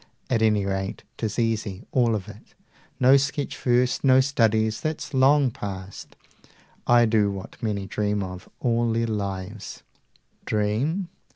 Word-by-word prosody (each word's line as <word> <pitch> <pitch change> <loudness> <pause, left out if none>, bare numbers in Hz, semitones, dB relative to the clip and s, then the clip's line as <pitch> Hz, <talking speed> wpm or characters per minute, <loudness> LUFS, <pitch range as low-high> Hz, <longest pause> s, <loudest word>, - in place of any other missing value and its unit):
At 115 -3 +2
any 105 -3 +3
rate 95 0 -3
'tis 110 -2 -3
easy, 110 -3 -1
all 120 -3 +2
of 95 -3 -5
it! 110 0 -14 0.4
No 130 +1 +6
sketches 140 +1 -2
first, 125 0 +2
no 130 -1 +6
studies, 110 -5 +2
that's 155 -1 -4
long 135 0 +4
past: 95 -2 -8 0.7
I 120 -1 +6
do 110 -2 +2
what 100 +4 -8
many 105 -4 -2
dream 105 0 -1
of, 90 -1 -8
all 115 -1 +1
their 115 +1 +1
lives, 100 -1 -5 0.6
Dream? 115 - 0
110 Hz, 135 wpm, -25 LUFS, 105-125 Hz, 0.7 s, No